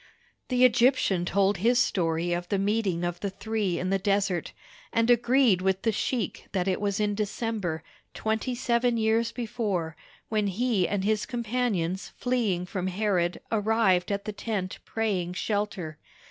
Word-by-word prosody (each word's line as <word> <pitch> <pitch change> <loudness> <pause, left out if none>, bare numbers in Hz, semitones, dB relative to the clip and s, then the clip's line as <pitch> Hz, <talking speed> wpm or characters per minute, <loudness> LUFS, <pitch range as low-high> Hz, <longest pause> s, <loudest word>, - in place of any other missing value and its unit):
The 250 -1 +4
Egyptian 240 -7 +3
told 195 +2 +2
his 235 +7 +3
story 170 -5 +1
of 175 0 -3
the 200 - +1
meeting 195 -3 0
of 175 0 -2
the 200 - -2
three 200 -2 -2
in 185 +1 -2
the 195 - +2
desert, 195 -3 0 0.4
and 230 +1 +3
agreed 240 -4 +4
with 190 0 0
the 225 - +3
sheik 220 -1 -2
that 185 -1 0
it 190 +1 0
was 200 -1 0
in 210 -1 +1
December, 205 -5 -2 0.3
twenty 220 +3 -1
seven 240 -1 +1
years 225 +1 +2
before, 210 -9 -2 0.3
when 215 -2 0
he 205 -1 +1
and 200 -2 -1
his 215 +1 0
companions 225 -7 -1
fleeing 225 -8 0
from 185 0 -3
Herod 185 -3 0
arrived 210 -4 +2
at 200 0 -2
the 215 - -4
tent 205 -4 -3
praying 195 -6 -1
shelter. 195 -6 -2
205 Hz, 155 wpm, -27 LUFS, 185-225 Hz, 0.4 s, The